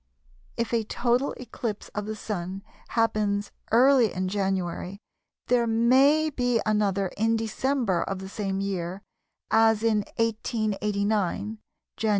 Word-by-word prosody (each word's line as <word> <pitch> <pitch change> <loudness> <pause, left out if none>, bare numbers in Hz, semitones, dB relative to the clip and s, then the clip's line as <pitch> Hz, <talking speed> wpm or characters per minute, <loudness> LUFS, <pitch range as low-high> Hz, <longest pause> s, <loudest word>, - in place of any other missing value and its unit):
If 235 +1 -2
a 230 -1 +2
total 240 +5 0
eclipse 230 -3 -5
of 210 0 -5
the 215 - -3
Sun 195 -2 -5 0.2
happens 210 -3 0 0.2
early 245 -1 +5
in 185 0 -2
January 190 -1 -2 0.5
there 240 -1 +2
may 265 +7 +4
be 245 -3 +1
another 200 -3 +1
in 225 +2 +2
December 225 -3 0
of 195 - -3
the 190 0 -7
same 195 -2 -3
year, 190 -1 -3 0.5
as 225 -1 +4
in 225 -2 +3 0.2
1889 210 -2 -1 0.4
(Jan. 220 - 0
215 Hz, 125 wpm, -26 LUFS, 195-230 Hz, 0.5 s, early